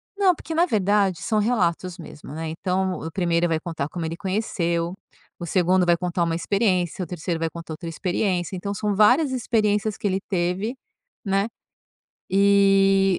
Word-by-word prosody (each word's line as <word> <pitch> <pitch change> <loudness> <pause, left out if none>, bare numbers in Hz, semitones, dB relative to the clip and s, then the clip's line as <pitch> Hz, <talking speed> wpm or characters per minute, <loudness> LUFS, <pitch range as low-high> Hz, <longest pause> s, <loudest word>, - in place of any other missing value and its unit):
Não, 395 -2 +4
porque 325 - -7
na 340 +2 +4
verdade 200 - +1
são 215 - +1
relatos 185 -5 0
mesmo, 150 -4 -10
né, 160 +1 -4
então 185 +3 -1
o 160 - -5
1º 170 -1 +1
vai 165 -1 0
contar 160 -4 -4
como 170 -1 -4
ele 165 +1 -4
conheceu, 175 -4 -1 0.5
o 175 - -4
2º 180 +1 +2
vai 175 0 +4
contar 175 0 -1
uma 165 -1 0
experiência, 185 -1 0
o - - -4
3º 170 -1 -3
vai 165 0 -1
contar 165 0 -8
outra 160 +2 -8
experiência, 180 +1 -1
então, 200 +3 -4
são 205 0 -1
várias 250 +8 +5
experiências 215 -4 0
que - - -2
ele 190 -1 0
teve, 190 +5 -1 0.5
né, 195 +1 +1 0.8
e 195 -1 +4
185 Hz, 170 wpm, -23 LUFS, 170-205 Hz, 0.8 s, várias